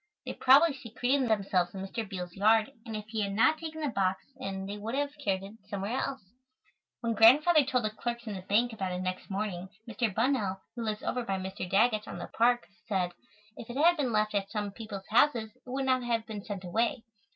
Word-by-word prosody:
They - - -4
probably 280 +5 +6
secreted 250 +1 0
themselves 195 -4 +1
in 190 0 -4
Mr. 220 +1 -5
Beals' 180 -3 -5
yard 215 +5 +3 0.2
and 220 - -4
if 210 0 -5
he 220 -1 -2
had 200 -1 -1
not 225 +9 +4
taken 315 -1 -6
the 295 - 0
box 190 -4 0
in 195 -7 -5
they 205 +1 -5
would 225 +4 -4
have 285 +1 -1
carried 195 -4 0
it 200 +2 -9 0.2
somewhere 200 +4 -2
else." 270 -5 -3 0.8
When 230 -1 0
Grandfather 290 +9 +7
told 255 -2 0
the 215 - 0
clerks 235 +2 -4
in 215 - -4
the 190 - -5
bank 220 +5 +2
about 190 -4 -3
it 180 - -3
next 185 0 -4
morning, 190 -2 -3 0.2
Mr. 230 0 -1
Bunnell, 215 -3 0
who 240 - -6
lives 215 -1 -3
over 250 - -1
by 195 -4 -1
Mr. 190 -1 -5
Daggett's, 215 +2 +3
on - - -6
the - - -5
park, 240 +1 +2 0.2
said, 185 -5 0 0.4
if 230 - -10
it 240 - -5
had 340 +4 +5
been 275 -6 -1
left 215 -1 +1
at 200 -1 -1
some 205 -2 -3
people's 200 -2 -7
houses 230 -2 +3
it 255 - -17
would 265 +1 -1
not 255 -1 +3
have 230 -2 -1
been 210 -3 -6
sent 200 -3 -6
away. 225 +5 0
220 Hz, 220 wpm, -30 LUFS, 195-245 Hz, 0.8 s, Grandfather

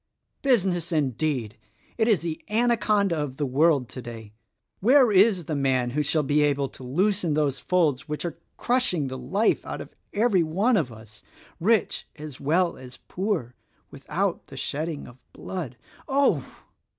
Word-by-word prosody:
Business 185 - +1
indeed! 135 -6 -1 0.4
It 225 -1 +1
is 215 -7 +3
the 165 -2 -4
anaconda 210 -4 +2
of 145 -3 -3
the 145 - 0
world 140 0 +3
today 115 -4 -9 0.5
Where 250 +2 +5
is 195 -3 +4
the 155 -1 -2
man 130 -3 +1
who 150 +4 0
shall 150 +1 +1
be 145 +2 +2
able 140 -2 +1
to 130 - -12
loosen 180 +4 +1
those 145 -3 0
folds 155 -6 +1
which 150 +3 -3
are 170 - -5 0.2
crushing 235 - +1
the 130 - -5
life 195 - +1
out - - -6
of - - -9 0.2
every 210 -3 +3
one 195 +10 +2
of 150 - 0
us, 110 -1 -14 0.4
rich 215 +4 +1
as 150 -3 -9
well 170 +5 +1
as 125 -1 -12
poor, 180 - -2 0.4
without - - -2
the - - -11
shedding 155 +1 -3
of 120 +1 -15
blood? 155 -10 -6 0.3
Oh!" 275 +1 +2
155 Hz, 155 wpm, -25 LUFS, 135-200 Hz, 0.5 s, Where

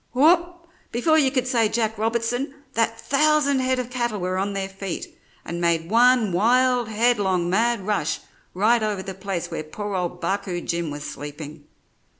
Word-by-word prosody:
"Whoop! 340 +5 +3 0.3
Before 315 +7 +3
you 275 -3 +3
could 255 -2 -1
say 230 -4 +2
Jack 220 -1 0
Robertson, 235 +5 -1 0.2
that 230 0 0
thousand 280 +1 +2
head 260 0 +1
of 250 -1 -4
cattle 240 -4 -1
were 185 +1 -1
on 200 +1 -1
their 195 -1 -2
feet, 195 -1 -6 0.3
and 170 0 -4
made 170 0 0
one 240 -2 +4
wild, 245 +5 +3
headlong, 205 -6 +1
mad 230 0 +1
rush 200 -7 0 0.4
right 220 +5 +3
over 210 -3 -2
the 190 - -6
place 190 -2 -4
where - - -3
poor 205 +6 -6
old 180 -1 -2
Barcoo 195 -2 -2
Jim 170 -2 -2
was 145 0 -6
sleeping. 145 +1 -8
220 Hz, 165 wpm, -23 LUFS, 185-250 Hz, 0.4 s, one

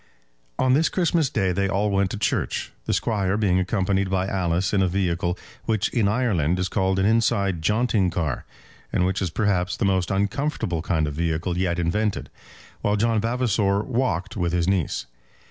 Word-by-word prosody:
On 130 0 +3
this 155 +4 +3
Christmas 170 -5 +1
Day 95 -6 0
they 100 +2 0
all 100 +2 +1
went 100 -1 +2
to 105 - -4
church, 105 - -1
the - - -1
Squire 100 -2 0
being 95 -4 +2
accompanied 95 0 0
by 95 0 0
Alice 95 -1 0
in 100 - +3
a 95 - +3
vehicle 90 -1 -1 0.3
which 110 -2 +1
in 115 -5 +1
Ireland 100 - +1
is 90 0 -1
called 95 -2 +1
an 95 - +2
inside 100 -5 +2
jaunting 105 +1 +2
car, 80 -6 -2 0.5
and 90 - +1
which 95 +1 -1
is 95 - 0
perhaps 95 0 0
the - - 0
most 95 -2 +1
uncomfortable 100 - -1
kind 80 -2 0
of 75 - -3
vehicle 80 +2 -1
yet 90 -1 0
invented; 100 +5 -1 0.5
while 105 - +1
John 110 0 +1
Vavasor 110 -4 +1
walked 120 -6 -1
with 90 -4 -1
his 85 -1 +1
niece. 95 -10 0
95 Hz, 180 wpm, -24 LUFS, 90-105 Hz, 0.5 s, On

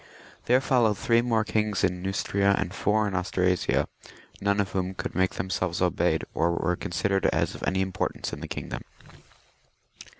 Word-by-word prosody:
There 125 +2 +4
followed 120 -6 +3
three 115 0 +3
more 115 -2 +1
kings 105 -2 0
in 90 -1 +1
Neustria 100 +1 +1
and 95 -1 -2
four 105 +1 +1
in 100 - -3
Anstrasia, 90 -1 +1 0.5
none 100 +1 +1
of 100 -1 0
whom 95 -1 -2
could - - -4
make 95 0 +1
themselves 90 -1 -2
obeyed, 90 -3 +1
or 85 +1 +1
were 90 +1 0
con - - -6
sidered 95 +2 +1
as - - +1
of - - -10
any 95 0 +1
importance 95 -1 -2
in - - -6
the - - -5
kingdom. - - -5
95 Hz, 170 wpm, -27 LUFS, 90-105 Hz, 0.5 s, There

